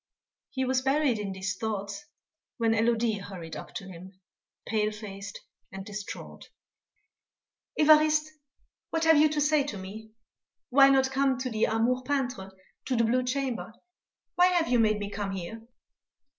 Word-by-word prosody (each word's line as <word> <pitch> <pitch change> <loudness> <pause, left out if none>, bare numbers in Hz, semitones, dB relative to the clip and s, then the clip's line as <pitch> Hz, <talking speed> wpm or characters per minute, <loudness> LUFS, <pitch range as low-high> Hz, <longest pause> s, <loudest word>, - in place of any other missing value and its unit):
He 260 -1 -2
was 255 0 +1
buried 270 -3 +1
in 200 -2 -3
these 190 0 -3
thoughts 215 +5 -4 0.5
when 230 -2 +2
Élodie 225 -2 +1
hurried 175 -5 -8
up - - -8
to 195 - -6
him, 185 +1 -12 0.5
pale 215 -1 0
faced 205 -1 -8 0.3
and 195 0 -8
distraught: 205 -1 -8 1.3
"Évariste, 310 0 +5 0.6
what 325 0 -1
have 320 -2 +6
you 305 +1 +5
to 300 0 -1
say 295 0 +3
to 250 -8 -5
me? 215 +4 -9 0.6
Why 275 +1 +7
not 265 -1 +3
come 270 -1 +2
to 255 0 -4
the 220 0 +2
Amour 235 +3 +1
peintre 255 -7 -2 0.4
to 260 - -1
the 230 - +3
blue 240 +3 +2
chamber? 255 -3 -3 0.6
Why 360 0 +5
have 350 -5 +1
you 245 -1 +3
made 215 -2 +3
me 205 -1 -5
come 200 -1 -3
here?" 190 +4 -6
230 Hz, 155 wpm, -28 LUFS, 205-275 Hz, 1.3 s, Why